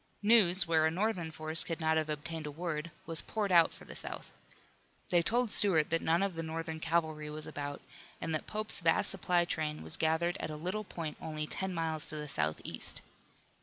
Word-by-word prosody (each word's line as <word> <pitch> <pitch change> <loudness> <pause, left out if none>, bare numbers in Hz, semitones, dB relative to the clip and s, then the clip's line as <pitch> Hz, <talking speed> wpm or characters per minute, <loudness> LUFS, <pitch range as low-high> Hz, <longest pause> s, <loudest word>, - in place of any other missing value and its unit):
News, 205 -4 +6
where 160 -1 +3
a - - +2
Northern 180 -1 -1
force 155 0 +2
could 165 -1 -4
not 160 -1 +2
have 155 -1 0
obtained 155 +1 -4
a - - -5
word, 160 0 -4 0.2
was 165 -1 -2
poured 210 -3 -2
out 170 -2 +6
for - - -10
the - - -10
South. - - -6 0.8
They 175 - +5
told 235 +5 +1
Stuart 165 -9 +4
that 165 - +2
none 165 +4 +2
of 195 -2 -1
the 165 - -4
Northern 160 0 -4
cavalry 160 -2 -1
was 155 0 -6
about, 145 0 -6 0.4
and 160 - -3
that 155 - -2
Pope's 215 0 -3
vast 165 -1 +3
supply 180 -2 +2
train 155 - -3
was 80 - -1
gathered 160 +2 +1
at - - -3
a 155 - -5
little 185 +7 -3
point 160 -4 -6
only 155 -1 -3
ten 190 +5 0
miles 160 -3 -2
to - - +3
the 150 0 -5
southeast. 75 - +1
165 Hz, 205 wpm, -32 LUFS, 155-175 Hz, 0.8 s, News